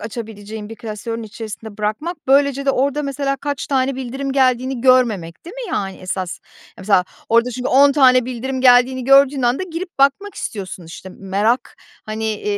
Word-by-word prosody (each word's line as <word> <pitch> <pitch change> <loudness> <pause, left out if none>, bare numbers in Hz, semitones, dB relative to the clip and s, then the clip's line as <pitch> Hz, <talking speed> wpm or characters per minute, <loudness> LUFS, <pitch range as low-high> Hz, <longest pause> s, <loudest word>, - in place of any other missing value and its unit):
açabileceğin 215 -1 -7
bir 225 - -8
klasörün 225 +1 -6
içerisinde 220 0 -8
bırakmak, 215 +12 -2
böylece 275 0 +3
de - - +5
orada 280 +3 0
mesela 275 0 -2
kaç 285 0 -4
tane 265 -1 0
bildirim 265 +1 -4
geldiğini 255 -1 +1
görmemek, 230 - +2
değil 360 +7 -10
mi, - - -6
yani, 195 -1 -2
esas? 185 -1 -4 0.4
Mesela 190 -1 +2 0.2
orada 235 +2 +3
çünkü 250 +1 -3
10 280 +2 +5
tane 255 -3 +5
bildirim 255 +1 -4
geldiğini 250 0 +4
gördüğün 275 0 +5
anda 245 +9 +1
girip 345 -2 -7
bakmak 320 +9 +2
istiyorsun, 190 -4 -6
işte, 175 +3 -10
"Merak, 200 +6 -1 0.3
hani, 215 0 -4
250 Hz, 155 wpm, -19 LUFS, 215-275 Hz, 0.4 s, de